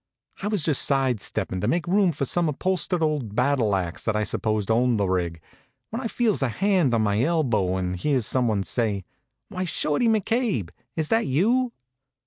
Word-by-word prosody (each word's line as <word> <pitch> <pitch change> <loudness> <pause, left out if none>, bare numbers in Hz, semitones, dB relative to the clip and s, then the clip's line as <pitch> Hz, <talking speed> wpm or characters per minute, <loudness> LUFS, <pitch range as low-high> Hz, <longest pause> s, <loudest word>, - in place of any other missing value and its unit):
I 200 - -2
was 205 -6 0
just 150 -5 +3
side 135 -5 +1
steppin' 95 -1 -3
to 105 - 0
make 165 +5 0
room 190 0 +3
for 140 -2 -2
some 170 +4 +1
upholstered 180 +2 -1
old 145 -9 -1
battle 125 -5 +2
ax 90 -2 -3
that 110 - 0
I 105 - +1
supposed 110 0 -1
owned 120 0 +2
the 100 - +1
rig, 85 -3 -1 0.5
when 230 +3 -3
I 245 - -2
feels 225 -5 0
a 135 - +1
hand 175 - +2
on 110 - +2
my 105 +1 +1
elbow 120 - +1
and 90 -1 -2
hear 135 +9 +1
some 125 +2 +1
one 105 -3 0
say: 100 0 -1 0.5
"Why, 185 - -3
Shorty 165 +5 0
McCabe! 220 - 0 0.2
is 160 -2 -1
that 225 -5 +2
you?" 230 - +2
135 Hz, 190 wpm, -24 LUFS, -, 0.5 s, just